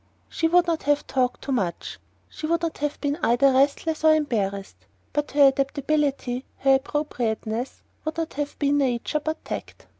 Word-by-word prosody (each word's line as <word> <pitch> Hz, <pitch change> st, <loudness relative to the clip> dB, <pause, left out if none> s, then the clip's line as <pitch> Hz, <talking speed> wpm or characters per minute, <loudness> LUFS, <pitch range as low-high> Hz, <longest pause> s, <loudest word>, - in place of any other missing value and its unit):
She 325 Hz, -, 0 dB
would 350 Hz, +1 st, +4 dB
not 335 Hz, -2 st, -1 dB
have 290 Hz, 0 st, +2 dB
talked 250 Hz, -2 st, -1 dB
too 275 Hz, -, -4 dB
much; 190 Hz, -10 st, -2 dB, 0.3 s
she 310 Hz, -, -6 dB
would 335 Hz, +1 st, 0 dB
not 330 Hz, -, -2 dB
have 295 Hz, 0 st, -2 dB
been 285 Hz, +2 st, -1 dB
either 255 Hz, +4 st, +4 dB
restless 285 Hz, +4 st, +1 dB
or 315 Hz, 0 st, +7 dB
embarrassed; 200 Hz, -, -2 dB, 0.3 s
but 295 Hz, 0 st, -1 dB
her 285 Hz, -1 st, +7 dB
adaptability, 275 Hz, -2 st, -1 dB
her 270 Hz, 0 st, +4 dB
appropriateness, 250 Hz, -4 st, -2 dB, 0.2 s
would 315 Hz, +1 st, -4 dB
not 330 Hz, -1 st, -3 dB
have 290 Hz, 0 st, -4 dB
been 290 Hz, 0 st, +2 dB
nature 260 Hz, +2 st, 0 dB
but 315 Hz, +1 st, -4 dB
"tact." -, -, -7 dB
280 Hz, 170 wpm, -24 LUFS, 250-305 Hz, 0.3 s, or